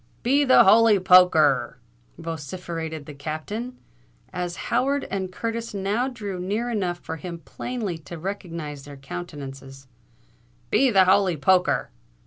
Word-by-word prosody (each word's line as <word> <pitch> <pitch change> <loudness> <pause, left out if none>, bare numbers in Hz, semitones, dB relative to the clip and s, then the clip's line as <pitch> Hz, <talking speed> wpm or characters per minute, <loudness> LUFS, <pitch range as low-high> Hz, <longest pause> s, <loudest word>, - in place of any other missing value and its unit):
"Be 275 +4 +3
the 260 - +7
holy 220 +1 +6
poker 180 -2 +6
r!" 140 -4 +2 0.4
vociferated 165 -1 -6
the 150 - -9
Captain, 160 - -5 0.6
as 175 -1 -3 0.2
Howard 280 +2 +1
and 190 -1 -3
Curtis 230 +2 -4
now 205 +6 0
drew 205 -7 -6
near 210 +7 -2
enough 185 -6 -1
for 165 -1 -7
him 170 +1 -7
plainly 220 -9 -4
to 160 +2 -9
recognise 165 -5 -6
their 145 -1 -10
countenances: 135 -3 -8 0.9
"be 270 - +4
the 195 -5 +5
holy 190 -2 +3
poker!" 180 +5 +2
180 Hz, 130 wpm, -24 LUFS, 160-210 Hz, 0.9 s, the